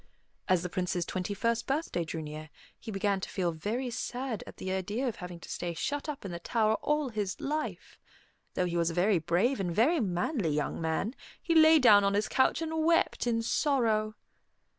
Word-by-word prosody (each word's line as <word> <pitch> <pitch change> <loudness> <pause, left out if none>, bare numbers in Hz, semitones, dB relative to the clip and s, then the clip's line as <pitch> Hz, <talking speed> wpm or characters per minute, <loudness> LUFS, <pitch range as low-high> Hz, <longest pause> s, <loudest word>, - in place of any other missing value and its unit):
As 185 -2 +3
the 180 - -3
Prince's 180 -1 -1
twenty 185 +3 -3
first 230 +3 0
birthday 275 - -1
drew 160 0 -5
near, 155 +1 -8 0.3
he - - -9
began 200 -1 0
to - - -5
feel 180 -3 -1
very 225 +10 -3
sad 245 0 -4
at - - -11
the 185 - -4
idea 205 +7 -2
of 235 - -3
having 180 -2 -8
to - - -10
stay 175 -1 -4
shut 290 - -3
up 285 -8 -6
in 190 - -4
the 170 - -5
tower 220 +4 +1
all 300 -2 0
his 205 -4 -3
life. 300 +2 -4 0.6
Though 180 - +1
he 175 -1 -2
was 170 -1 +2
a 165 - -5
very 185 +1 +3
brave 180 - +1
and 185 -2 -1
very 270 - +3
manly 190 - 0
young 150 +2 -1
man, 160 +8 -1 0.3
he 335 - -1
lay 320 0 +7
down 215 -8 +7
on 200 0 +2
his 210 +1 +1
couch 265 +5 +2
and 320 0 -1
wept 330 -6 +2
in 230 -1 +1
sorrow. 225 -5 +1
210 Hz, 205 wpm, -30 LUFS, 180-260 Hz, 0.6 s, lay